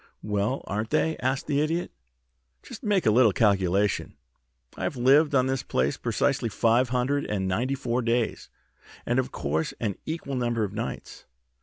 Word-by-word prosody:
"Well, 105 Hz, +5 st, -1 dB
aren't 105 Hz, +2 st, -3 dB
they?" 160 Hz, +1 st, +1 dB
asked 130 Hz, +2 st, -1 dB
the 145 Hz, -1 st, +1 dB
Idiot. 165 Hz, +3 st, -1 dB, 0.7 s
"Just -, -, -10 dB
make 205 Hz, -6 st, +1 dB
a 110 Hz, -, +5 dB
little 115 Hz, -1 st, +5 dB
calculation. 100 Hz, -1 st, +1 dB, 0.6 s
I've -, -, -3 dB
lived 140 Hz, +4 st, +4 dB
on 130 Hz, -1 st, +4 dB
this 130 Hz, -1 st, -1 dB
place 65 Hz, +2 st, 0 dB
precisely 120 Hz, +1 st, 0 dB
five 115 Hz, +4 st, +2 dB
hundred 130 Hz, +3 st, 0 dB
and 95 Hz, -3 st, -2 dB
ninety 125 Hz, +9 st, 0 dB
four 125 Hz, -2 st, -1 dB
days, 115 Hz, -1 st, -1 dB, 0.6 s
and, 120 Hz, +2 st, +1 dB
of 130 Hz, -, -2 dB
course, 75 Hz, +3 st, -2 dB
an 105 Hz, -5 st, -2 dB
equal 155 Hz, -3 st, -4 dB
number 120 Hz, -3 st, 0 dB
of 100 Hz, -1 st, -3 dB
nights. 115 Hz, +2 st, -6 dB
120 Hz, 160 wpm, -26 LUFS, 105-135 Hz, 0.7 s, a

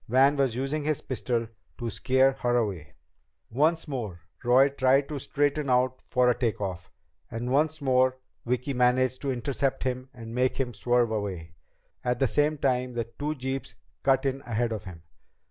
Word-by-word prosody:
Van 135 Hz, +4 st, +5 dB
was 135 Hz, -5 st, +1 dB
using 135 Hz, +4 st, -2 dB
his 155 Hz, -1 st, 0 dB
pistol 120 Hz, -2 st, -2 dB, 0.3 s
to 120 Hz, -, -4 dB
scare 130 Hz, +5 st, +3 dB
her 120 Hz, -2 st, 0 dB
away! 95 Hz, -10 st, -2 dB, 0.6 s
Once 160 Hz, +7 st, +2 dB
more, 110 Hz, -, -5 dB, 0.2 s
Roy 130 Hz, +3 st, +5 dB
tried 135 Hz, 0 st, +3 dB
to 150 Hz, -2 st, -3 dB
straighten 145 Hz, 0 st, 0 dB
out 125 Hz, +1 st, +2 dB
for 125 Hz, 0 st, +1 dB
a 125 Hz, -, +5 dB
take 115 Hz, -2 st, -1 dB
off. 90 Hz, -3 st, -4 dB, 0.4 s
And 120 Hz, +2 st, -4 dB
once 155 Hz, +2 st, +1 dB
more 130 Hz, -1 st, +3 dB, 0.3 s
Vicki 125 Hz, +3 st, -1 dB
managed 125 Hz, 0 st, +2 dB
to 140 Hz, -, -1 dB
intercept 130 Hz, +2 st, -1 dB
him 130 Hz, 0 st, -3 dB
and 115 Hz, -4 st, -9 dB
make 125 Hz, +1 st, +1 dB
him 125 Hz, -3 st, -1 dB
swerve 120 Hz, -1 st, +1 dB
away. 95 Hz, -6 st, -4 dB, 0.5 s
At 125 Hz, -1 st, 0 dB
the 135 Hz, -, +2 dB
same 150 Hz, +4 st, +1 dB
time, 125 Hz, -2 st, 0 dB
the 120 Hz, -1 st, -1 dB, 0.2 s
two 150 Hz, +1 st, -1 dB
jeeps 130 Hz, 0 st, -4 dB, 0.3 s
cut 135 Hz, 0 st, +2 dB
in 135 Hz, 0 st, -1 dB
ahead 120 Hz, -1 st, -1 dB
of 110 Hz, -3 st, -4 dB
him. 85 Hz, -4 st, -10 dB
130 Hz, 175 wpm, -27 LUFS, 120-135 Hz, 0.6 s, Van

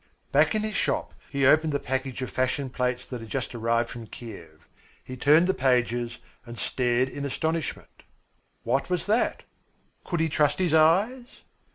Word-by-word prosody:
Back -, -, +4 dB
in 215 Hz, -, 0 dB
his 215 Hz, 0 st, -3 dB
shop -, -, -1 dB, 0.2 s
he 140 Hz, -1 st, 0 dB
opened 155 Hz, +2 st, +4 dB
the 140 Hz, -, +1 dB
package 130 Hz, -1 st, -3 dB
of 130 Hz, -, -5 dB
fashion 130 Hz, +1 st, -1 dB
plates 125 Hz, -1 st, -1 dB
that 125 Hz, -3 st, -6 dB
had 115 Hz, -, -10 dB
just 130 Hz, +1 st, -3 dB
arrived 115 Hz, 0 st, 0 dB
from 115 Hz, -2 st, -8 dB
Kiev. 105 Hz, -7 st, -11 dB, 0.4 s
He 130 Hz, -, -8 dB
turned 150 Hz, +6 st, +5 dB
the 190 Hz, -, +2 dB
pages 120 Hz, -3 st, +1 dB, 0.3 s
and 120 Hz, -1 st, -10 dB
stared 125 Hz, +1 st, +1 dB
in 140 Hz, +1 st, -6 dB
astonishment. 160 Hz, +3 st, -3 dB, 0.6 s
What 130 Hz, +7 st, 0 dB
was 180 Hz, -2 st, -1 dB
that? 220 Hz, +4 st, +1 dB, 0.6 s
Could 175 Hz, -, -2 dB
he 160 Hz, -, +2 dB
trust 145 Hz, -1 st, +2 dB
his 180 Hz, -4 st, +1 dB
eyes? 195 Hz, +11 st, +3 dB
135 Hz, 170 wpm, -26 LUFS, 120-160 Hz, 0.6 s, turned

